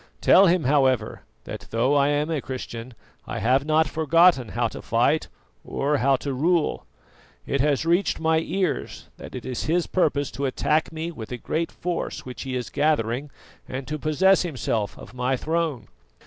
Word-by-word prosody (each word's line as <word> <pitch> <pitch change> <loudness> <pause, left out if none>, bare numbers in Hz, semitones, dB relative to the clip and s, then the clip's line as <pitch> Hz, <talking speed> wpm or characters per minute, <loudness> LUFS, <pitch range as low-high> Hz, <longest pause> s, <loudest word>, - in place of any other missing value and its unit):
Tell 195 - +6
him, 175 0 +3
however, 130 -5 +2 0.2
that - - -8
though 120 +5 +1
I 140 -1 +4
am 145 +2 0
a 155 -4 -1
Christian 125 -2 -7 0.3
I - - -4
have 130 +4 +2
not 155 0 +3
forgotten 160 -3 +4
how - - 0
to - - -9
fight - - +1 0.4
or 145 +2 0
how 135 +1 +3
to 140 +1 -4
rule. 165 +5 0 0.6
It 140 - 0
has 145 +1 +1
reached 175 +4 +2
my 160 0 +2
ears 185 0 -3
that - - -10
it 125 - -7
is 130 -2 -4
his 170 +2 +1
purpose 145 -6 0
to 140 0 -2
attack 155 +5 0
me 160 +1 -4
with 115 -9 -9
a 125 - -3
great 160 +7 -2
force 175 -1 -4
which 125 -1 -7
he 130 -2 -4
is 125 -1 -4
gathering, 140 -2 0 0.4
and 130 0 -5
to 155 0 -4
possess 185 +6 +3
himself 115 - -2
of - - -12
my 125 +1 0
throne. 160 -5 -2
145 Hz, 175 wpm, -24 LUFS, 130-160 Hz, 0.6 s, Tell